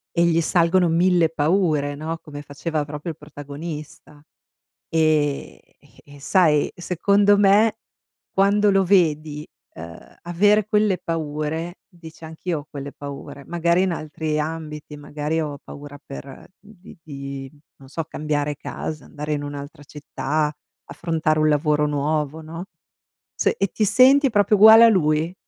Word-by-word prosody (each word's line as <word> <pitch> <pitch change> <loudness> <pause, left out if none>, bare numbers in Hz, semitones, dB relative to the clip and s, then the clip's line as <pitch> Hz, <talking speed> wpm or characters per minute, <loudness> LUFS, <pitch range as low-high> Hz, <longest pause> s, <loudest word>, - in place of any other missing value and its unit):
E 170 0 +3
gli 165 -1 +2
salgono 175 +1 +2
mille 170 0 +3
paure 155 -2 0
no, 160 +3 -5
come 145 -1 -9
faceva 150 +1 -4
proprio 150 +3 -6
il - - -26
protagonista. 150 0 -9 0.7
E 155 -3 0 0.4
e 145 0 -15
sai 155 -3 +2
secondo 200 +4 +2
me, 205 +2 +4 0.5
quando 200 +1 +3
lo 195 0 +3
vedi 155 -5 +1 0.3
ehm 85 +1 -11 0.2
avere 205 +4 +2
quelle 210 -3 +2
paure 160 +1 -4
dici: 165 -3 -14
"Anch'io 160 +1 -4
ho 145 - -13
quelle 140 -1 -7
paure", 140 0 -9
magari 170 +2 +1
in 190 -1 +1
altri 155 -1 -3
ambiti, 150 -1 -5
magari 150 +2 -3
ho 145 -2 -5
paura 145 0 -11
per 135 -1 -10
di 200 -2 -16
di 140 -3 -8 0.3
non 135 -1 -16
so 165 +3 -4
cambiare 150 -2 -2
casa, 150 +2 -6
andare 150 0 -5
in 145 -1 -3
un'altra 145 0 -8
città, 150 +1 -3 0.3
affrontare 160 -2 -1
un 155 0 +3
lavoro 150 0 +2
nuovo, 150 +1 -1
no, 165 +2 -8 0.7
s - - +1
e 195 - +1
ti 215 - +1
senti 270 +6 +5
proprio 205 -1 +3
uguale 220 +3 +9
a 230 - +8
lui. 160 -4 +1
155 Hz, 140 wpm, -22 LUFS, 145-175 Hz, 0.7 s, uguale